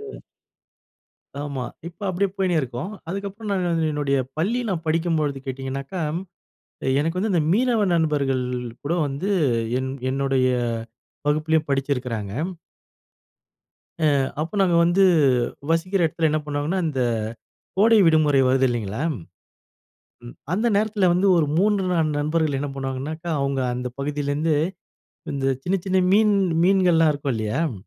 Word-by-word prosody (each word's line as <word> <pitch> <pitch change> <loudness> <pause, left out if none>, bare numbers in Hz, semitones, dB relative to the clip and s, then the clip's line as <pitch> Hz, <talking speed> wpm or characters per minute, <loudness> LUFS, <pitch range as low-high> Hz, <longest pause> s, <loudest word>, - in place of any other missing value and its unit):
ம். 425 0 -9 1.2
ஆமா. 140 -3 -4 0.2
இப்ப 170 - -18
அப்டியே 190 +2 +1
போயினே 185 -3 +1
இருக்கும். 125 - -5 0.2
அதுக்கு 200 +2 -3
அப்புறம் 210 +2 -7
நான் 180 -2 0
வந்து 165 -1 +1
என்னுடைய 140 -2 0 0.2
பள்ளி 220 +9 +1
நான் 170 -4 -2
படிக்கும்போழுது 155 -3 0
கேட்டீங்கன்னாக்கா? 135 +6 -4 1.0
எனக்கு 165 +4 -1
வந்து 210 +2 0
இந்த 165 - +3
மீனவ 235 -1 +2
நண்பர்கள் 140 -5 +1 0.4
கூட 155 +4 -1
வந்து 145 +8 -3 0.5
என் 130 0 -3 0.2
என்னுடைய 135 -1 +1 0.8
வகுப்பிலேயும் 155 +1 +1
படிச்சுருக்கிறாங்க. 125 -7 -1 1.7
ஆ 160 - +1 0.4
அப்ப 165 +6 -3
நாங்க 175 -3 +3
வந்து 175 +3 +3 0.7
வசிக்கிற 175 +2 +1
எடத்துல 160 +1 0
என்ன 155 - +1
பண்ணுவாங்கன்னா? 150 +5 -2
இந்த 135 -3 -2 0.8
கோடை 220 +2 +5
விடுமுறை 150 -4 +4
வருது 130 +1 +3
இல்லைங்களா, 115 +1 -3 1.5
அந்த 220 +6 +1
நேரத்துல 205 -2 +2
வந்து 190 +3 +2
ஒரு 155 - +3
3, 205 0 +2
4 155 -4 +1
நண்பர்கள் 155 -1 0
என்ன 145 0 -3
பண்ணுவாங்கனாக்க? 135 +4 -5
அவங்க 140 -1 0 0.2
அந்த 125 0 -3
பகுதியிலருந்து 145 +2 0 0.8
இந்த 135 -1 -2 0.2
சின்ன, 185 - +1
சின்ன 190 0 +1 0.2
மீன் 210 0 +5 0.3
மீன்கள்லாம் 175 -4 +4
இருக்கும் 140 -2 -2
இல்லையாம். 115 +7 -1
155 Hz, 125 wpm, -23 LUFS, 140-185 Hz, 1.7 s, கோடை